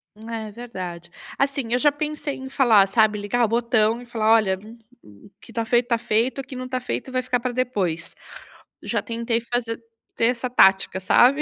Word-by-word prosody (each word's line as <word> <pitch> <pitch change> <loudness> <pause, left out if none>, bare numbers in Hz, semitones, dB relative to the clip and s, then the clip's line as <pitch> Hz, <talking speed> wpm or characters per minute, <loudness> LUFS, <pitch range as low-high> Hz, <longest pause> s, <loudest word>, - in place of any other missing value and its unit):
É 220 0 -6
verdade, 185 -7 -7 0.3
assim, 275 -4 -1
eu 245 - +3
já 295 +2 +4
pensei 295 0 -4
em 265 0 -8
falar, 225 -8 +5
sabe, 210 +1 +2
ligar 235 +4 0
o - - -7
botão 235 0 +1
e - - -11
falar: 225 -2 +1
"Olha, 215 -4 +3
m 225 +3 -13 0.2
m 100 -1 -17
o 200 - -17
que 230 - -15
tá 230 - -1
feito 240 +1 +2
tá 235 - +3
feito, 235 +3 0
o - - -17
que 265 0 -10
não 255 0 -6
tá 255 0 -2
feito, 255 +1 -4
vai 255 0 -1
ficar 250 0 -1
pra 250 +1 -2
depois", 200 -10 -2 0.7
já - - -1
tentei 230 0 -2
fazer 235 -1 -3 0.4
ter 230 - +2
essa 245 +1 -1
tática, 190 -4 +4
sabe, 260 +9 +5
235 Hz, 205 wpm, -23 LUFS, 215-250 Hz, 0.7 s, falar